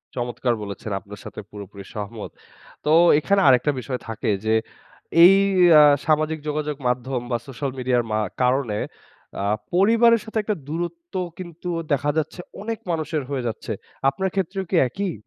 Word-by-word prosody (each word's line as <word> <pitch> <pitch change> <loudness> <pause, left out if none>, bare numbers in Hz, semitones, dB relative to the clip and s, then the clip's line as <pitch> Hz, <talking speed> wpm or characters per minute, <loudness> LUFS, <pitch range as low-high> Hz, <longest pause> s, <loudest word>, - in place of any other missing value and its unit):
চমৎকার 120 0 -1
বলেছেন 100 +1 -6
আপনার 100 +2 -12
সাথে - - -8
পুরোপুরি 100 -1 -9
সহমত। 105 +1 -6 0.5
তো 150 - +2 0.3
এখানে 195 +5 +2
আরেকটা 130 +2 +5
বিষয় 125 0 -4
থাকে 115 -1 -3 0.2
যে 110 - +2 0.7
এই 185 +3 +9 0.5
আ - - +8 0.2
সামাজিক 155 0 +1
যোগাযোগ 150 0 -2
মাধ্যম 125 +1 -1
বা 120 - +2
social 135 +1 -4
media 125 0 +1
র - - -7
মা 110 - +1 0.2
কারণে 125 -4 +1 0.6
আ - - -1 0.3
পরিবারের 230 +5 +5
সাথে 220 0 -5
একটা 210 0 -1
দূরত্ব 170 +2 -5 0.3
কিন্তু 175 -1 -7 0.2
দেখা 145 +1 +2
যাচ্ছে 160 +3 -2 0.2
অনেক 225 +1 -4
মানুষের 155 -2 -2
হয়ে 135 -3 -3
যাচ্ছে। 110 0 -4 0.4
আপনার 190 +8 -2
ক্ষেত্রেও 195 0 -2
কি - - +1
এক 125 - -15
ই? - - -4
145 Hz, 155 wpm, -23 LUFS, 120-175 Hz, 0.7 s, এই